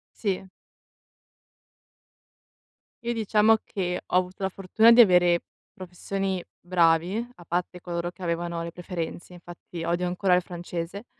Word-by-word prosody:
Sì. 195 -3 -2 2.6
Io 235 0 -1
diciamo 220 0 +3
che 180 -2 -3
ho - - -3
avuto 185 +1 0
la 190 - +1
fortuna 195 +5 +4
di 235 +1 +9
avere 180 -4 +5 0.3
professori 190 +1 -4 0.2
bravi, 175 +5 +2
a 175 - -14
parte 180 +1 -3
coloro 175 0 -3
che 185 - -19
avevano 170 -1 -2
le 170 0 -5
preferenze, 175 0 -6
infatti 175 -1 -9
odio 175 +2 0
ancora 180 +1 +2
il 180 - +1
francese. 175 +3 -6
180 Hz, 130 wpm, -26 LUFS, 175-195 Hz, 2.6 s, di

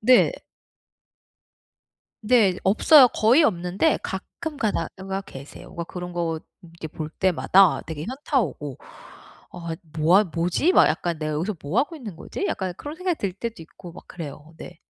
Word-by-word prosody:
네. 250 +3 +5 1.9
네. 210 -5 +4
없어요. 255 +8 +7
거의 245 +7 +4
없는데 185 - +1
가끔 290 - -6
가다가 195 - -3
계세요. 140 -7 -11
뭔가 170 - -6
그런 180 0 -7
거 165 -2 -2 0.2
이렇게 165 -2 -10
볼 155 0 -6
때마다 185 +1 +3
되게 155 -1 -5
현타 270 +3 -1
오고 145 - -5 0.8
'아. 170 -2 -5 0.2
뭐 165 +5 +5
하 210 - +5
뭐지?' 175 - 0
막 - - +6
약간 170 -2 -1
'내가 155 0 -3
여기서 175 +8 -2
뭐 150 +10 0
하고 310 +5 -1
있는 220 - -8
거지?' 395 - -5
약간 185 -2 -3
그런 295 +2 -7
생각이 365 -2 -2
들 195 -3 -3
때도 230 0 -6
있고 170 +2 -13
막 170 - -14
그래요. 155 -1 -9
네. 175 - -11
185 Hz, 295 characters per minute, -24 LUFS, 165-230 Hz, 1.9 s, 없어요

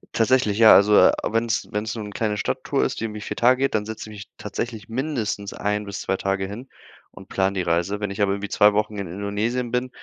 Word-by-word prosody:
Tatsächlich, 115 -3 +2
ja, 110 -1 +8
also, 105 +1 +5
äh, - - +6 0.2
wenn's 115 -1 -1
wenn's 105 +2 -3
nur 110 - -5
'ne 105 - -7
kleine 105 0 -2
Stadttour 135 +4 -1
ist, - - -2
die 115 - -2
irgendwie 105 -1 -6
4 - - -5
Tage 125 +2 +4
geht, 135 - +1
dann 105 -1 0
setze 110 0 -7
ich - - -10
mich 100 -1 -9
tatsächlich 115 -3 -5
mindestens 115 -6 -3
ein 105 0 -2
bis 100 0 -6
2 95 - -1
Tage 95 0 -1
hin 115 +7 -8 0.4
und 95 - -14
plane 95 0 0
die 95 - -1
Reise. 85 +4 -1
Wenn 105 -1 -2
ich 100 +1 -4
aber 100 -1 +2
irgendwie 100 0 -5
2 105 0 +4
Wochen 105 0 -1
in 100 -2 -4
Indonesien 105 +6 -2
bin, 125 +1 -1
105 Hz, 240 wpm, -23 LUFS, 100-115 Hz, 0.4 s, ja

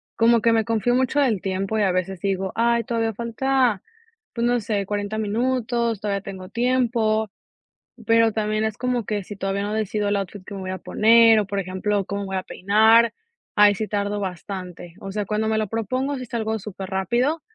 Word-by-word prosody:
como 230 0 +4
que 230 +1 +3
me 225 - +3
confío 230 +2 +1
mucho 260 +3 +1
del 235 -9 +2
tiempo 195 +2 -2
y - - +3
a 190 - +2
veces 185 0 -2
digo: 190 -1 -1
"Ay, 235 0 +2
todavía 230 -3 -1
falta, 235 -1 0 0.5
pues 235 0 0
no 245 0 +2
sé, 205 -2 -2
40 205 +1 -3
minutos, 235 0 0
todavía 200 -2 -1
tengo 190 -2 -8
tiempo", 230 -3 +1 0.8
pero 230 -1 +4
también 215 0 -1
es 220 -1 -2
como 250 -2 -1
que 205 0 -2
si 205 - -8
todavía 195 +1 -2
no 210 +1 -2
decido 210 -1 -1
el 205 - +1
outfit 195 0 -5
que 200 - -9
me 195 - -6
voy 185 - -4
a 185 - -4
poner 225 +3 +5
o, 205 - -2
por 200 0 -2
ejemplo, 195 +2 -1
cómo 200 0 -4
voy 190 0 -3
a 185 - -1
peinar, 220 +4 +4 0.4
ahí 205 0 +6
sí 215 - -2
tardo 205 0 -1
bastante, 180 -2 -6
o 195 - -7
sea, 210 -1 -2
cuando 215 +1 -1
me 220 0 +1
lo 215 -2 -1
propongo, 255 +6 -2
sí 255 - -7
salgo 220 -1 -2
superrápido, 200 - -2
215 Hz, 200 wpm, -23 LUFS, 195-230 Hz, 0.8 s, ahí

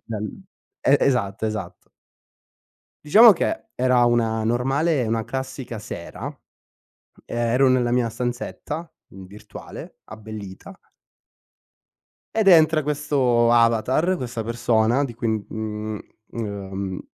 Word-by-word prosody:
dal 110 - -6 0.4
e 140 - +4
esatto, 110 -7 0
esatto. 100 -5 -5 1.2
Diciamo 215 +9 +8
che, 225 - -3
era 125 -1 +3
una 115 -2 +1
normale, 135 +5 +1
una 115 0 -1
classica 130 -3 -6
sera, 85 -4 -8 1.0
ehm, - - -7
ero 120 +3 +3
nella 125 -2 +2
mia 125 -1 +2
stanzetta 125 +7 -5 0.2
virtuale, 95 +2 -11
abbellita 110 -3 -10 1.6
ed 220 -3 +3
entra 160 -3 +6
questo 135 -5 +1
avatar, 120 +10 +2
questa 120 -6 -4
persona 115 +2 +1
di 130 - -5
cui, 115 0 -3
mhmm, 110 0 -4 0.3
mhmm, 100 -4 -6
ehm, 95 -1 -4
120 Hz, 105 wpm, -23 LUFS, 110-135 Hz, 1.6 s, Diciamo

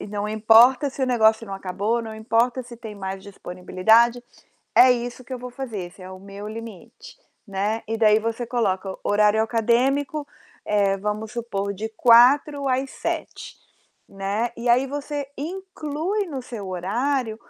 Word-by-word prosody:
E - - -7
não 205 0 -3
importa 230 +6 +5
se 270 - -10
o - - +2
negócio 220 -2 +3
não 195 - -5
acabou, 200 +5 -2
não 220 -1 -7
importa 230 +3 0
se 240 0 -11
tem 220 -2 -9
mais 190 0 -6
disponibilidade, 200 +5 +2 0.6
é 255 0 +8
isso 245 +1 -5
que 260 - -10
eu - - -6
vou 250 - -6
fazer, 245 -5 -6
esse 175 - -19
é 185 - -9
o 185 0 -10
meu 200 +1 -9
limite, 220 -3 -10 0.4
né". 210 +4 -1
E 225 - -1
daí 215 -1 +5
você 230 +2 -3
coloca: 195 -5 -1
horário 210 +1 +3
acadêmico, 260 +6 0 0.4
eh, 200 -2 +2
vamos 210 +2 -4
supor, 200 -4 -3
de 220 +3 -4
16:00 270 +4 +5
às 260 +1 0
19:00, - - -5 0.5
né. 200 +4 -2
E 235 +1 -3
aí 250 +3 +4
você 285 0 -5
inclui 365 +3 -3
no 280 -6 -5
seu 215 -6 -7
horário 220 +6 -1
230 Hz, 160 wpm, -23 LUFS, 205-255 Hz, 0.6 s, é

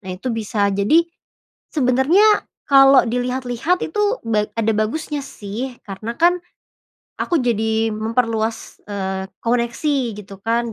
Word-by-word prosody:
nah, 190 - -11
itu 245 +6 -3
bisa. 210 -2 0
Jadi, 210 +13 +3 0.7
sebenernya 305 - +4 0.2
kalau 270 -2 +7
dilihat-lihat 250 +6 -1
itu 420 +7 0
ba 215 -2 +2
ada 225 -1 0
bagusnya 285 +7 -2
sih, 230 +2 -6 0.2
karena 215 +4 -5
kan 350 +1 +5 0.9
aku 340 - +1
jadi 220 -3 0
memperluas, 225 0 -2
eee, 190 -1 -4
koneksi 240 +5 0 0.2
gitu 195 -1 -11
kan. 230 +1 0
235 Hz, 120 wpm, -20 LUFS, 215-270 Hz, 0.9 s, kalau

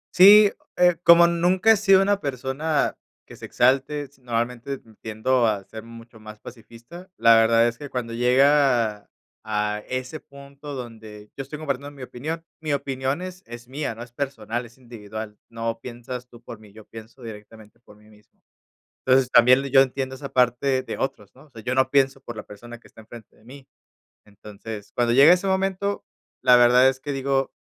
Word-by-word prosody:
Sí, 205 +2 +8 0.3
eh, 175 -1 +3
como 170 0 +7
nunca 180 +5 +2
he 220 - +4
sido 195 -2 +4
una 200 0 +1
persona 140 +3 -2 0.3
que - - -14
se - - -10
exalte, 135 +4 +1
s 140 -1 -17
normalmente, 120 +2 -3
mm, 115 -3 -21
tiendo 115 +3 0
a 105 -3 -1
ser 110 +3 -10
mucho 115 0 -14
más 110 0 -12
pacifista. 120 - -13
La 115 - +5
verdad 115 +1 +4
es 120 0 -5
que 145 - -8
cuando 120 -3 -5
llega 125 -3 +2 0.3
a 105 -1 -2
ese 130 +4 -5
punto 140 +1 -12
donde 110 -4 -10
yo - - -6
estoy 140 +3 -8
compartiendo 140 -2 -4
mi 140 -2 -12
opinión. 155 +7 -6 0.2
Mi 155 -2 -2
opinión 135 +3 -3
es 185 0 -9
es 120 0 -11
mía, 135 -2 -5
no 115 - -8
es 120 - -15
personal, 120 -3 -4
es 115 - -22
individual. 110 -3 -9
No 115 0 -4
piensas 125 0 -8
tú 120 -1 -17
por 115 - -10
mí. 105 -2 -17
Yo 110 0 -15
pienso 115 +3 -13
directamente 110 -1 -12
por 105 -3 -19
mí 105 0 -22
mismo. 105 -1 -24 0.7
Entonces, 130 -1 +3
también 125 +2 +6
l 140 0 -6
yo 135 0 +6
entiendo 130 0 -1
esa 140 +1 -8
parte 130 +1 +1
de - - -7
otros, 105 -6 -5
¿no? 135 - -18
O - - -27
sea, 115 -4 -12
yo 130 - -2
no 130 0 +1
pienso 135 -1 +1
por 120 -3 -10
la - - -6
persona 120 +3 -12
que - - -21
está - - -17
enfrente 110 0 -15
de 110 - -25
mí. 135 +3 -14 0.6
Entonces, 105 0 -11
cuando 120 -1 0
llega 140 +6 +7
ese 180 +2 +2
momento, 195 +1 -1 0.4
la 125 -1 +6
verdad 125 +2 +5
es 130 0 -5
que 145 +1 -5
digo, 135 0 -1
125 Hz, 195 wpm, -23 LUFS, 115-140 Hz, 0.7 s, Sí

